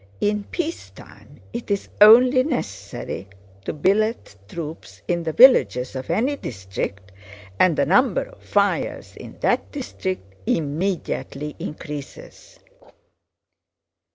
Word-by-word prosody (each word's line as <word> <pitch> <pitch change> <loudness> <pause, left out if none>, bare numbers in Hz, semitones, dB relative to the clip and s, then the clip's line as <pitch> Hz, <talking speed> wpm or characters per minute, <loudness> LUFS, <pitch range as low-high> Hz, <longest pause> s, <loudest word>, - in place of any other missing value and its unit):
In 205 0 0
peacetime 335 -1 -7
it 235 -1 -6
is 200 -1 -1
only 250 +5 +8
necessary 100 - -4 0.4
to - - -1
billet 200 - 0
troops 160 +5 -8
in 175 -1 0
the 165 -1 -2
villages 130 - +5
of 130 0 -6
any 265 +6 +1
district 100 - -6 0.5
and 175 -4 +4
the 140 - +3
number 250 - +3
of - - -16
fires - - -1
in - - -11
that - - +1
district 185 - -5
immediately 150 -2 -2
increases. 150 - -8
185 Hz, 105 wpm, -22 LUFS, -, 0.5 s, only